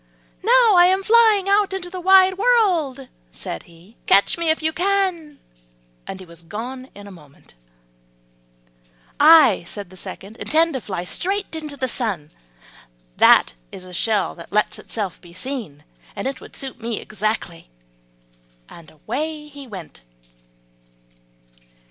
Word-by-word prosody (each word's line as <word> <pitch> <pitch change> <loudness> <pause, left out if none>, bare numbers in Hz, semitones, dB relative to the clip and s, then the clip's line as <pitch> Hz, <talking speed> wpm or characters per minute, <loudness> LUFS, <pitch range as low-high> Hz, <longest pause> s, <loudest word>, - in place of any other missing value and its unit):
"Now 470 +1 +5
I 350 - +8
am 380 +1 +1
flying 435 -3 +4
out 400 0 +2
into 380 -2 -4
the 370 - -6
wide 380 +1 +5
world," 360 - +1 0.2
said - - -7
he; 170 +7 -20
"catch 200 +1 +4
me 335 -1 -1
if 315 0 0
you 315 0 0
can;" 360 -5 -1 0.7
and 190 - -7
he 185 - -11
was 170 -1 -14
gone 245 +9 -7
in 205 0 -11
a 200 - -11
moment. 150 -6 -18 1.7
"I," 300 - +7
said 200 -2 -8
the - - -13
second, 195 +3 -10
"intend 325 +1 +1
to 265 - -3
fly 185 -5 -5
straight 390 - -2
to 305 -3 -6
the 260 -1 -2
sun, 200 - -3 0.9
that - - +5 0.2
is 185 - -10
a 180 0 -12
shell 210 +3 0
that 170 - -13
lets 210 +1 0
itself 200 -6 -5
be 175 -1 -16
seen, 185 - -6 0.3
and - - -3
it 270 0 -5
will - - -11
suit 265 -3 -8
me 230 -1 -3
exactly;" 215 - -4 1.0
and 170 -2 -14
away 300 - -5
he 285 -2 -11
went. 185 - -10
260 Hz, 145 wpm, -21 LUFS, -, 1.7 s, I